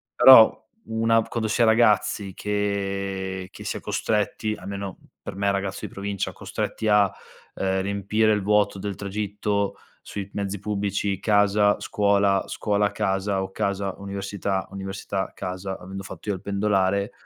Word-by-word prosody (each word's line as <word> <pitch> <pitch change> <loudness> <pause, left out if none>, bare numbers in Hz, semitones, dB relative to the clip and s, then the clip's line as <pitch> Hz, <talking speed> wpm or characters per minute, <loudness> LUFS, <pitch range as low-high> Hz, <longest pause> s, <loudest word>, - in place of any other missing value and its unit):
Però 130 -4 +8 0.3
una 115 0 +3
quando 110 -2 -3
si 120 - +1
è - - +7
ragazzi 105 -3 +3
che 100 -2 -2
che - - -10
si - - -2
è - - -9
costretti- 105 0 -1
almeno 100 -1 -6 0.2
per - - -7
me, 100 0 +1
ragazzo 100 -1 -2
di - - -8
provincia- 100 -1 -3
costretti 110 - -4
a, 105 -2 +4 0.4
ehm, 95 0 0
riempire 100 +2 +1
il 105 - 0
vuoto 105 -1 +2
del 100 0 -4
tragitto, 100 0 -2 0.3
sui 100 -1 -6
mezzi 100 0 -3
pubblici, 100 -1 -1
casa, 105 0 +3
scuola, 100 -1 +2
scuola-casa 100 -2 0
o 95 - -6
casa-università, 100 -1 -2
università-casa, 95 -1 -4
avendo 95 +2 -8
fatto 105 - -8
io 100 - +1
il 90 - -9
pendolare 100 -1 +1
100 Hz, 135 wpm, -24 LUFS, 95-105 Hz, 0.4 s, Però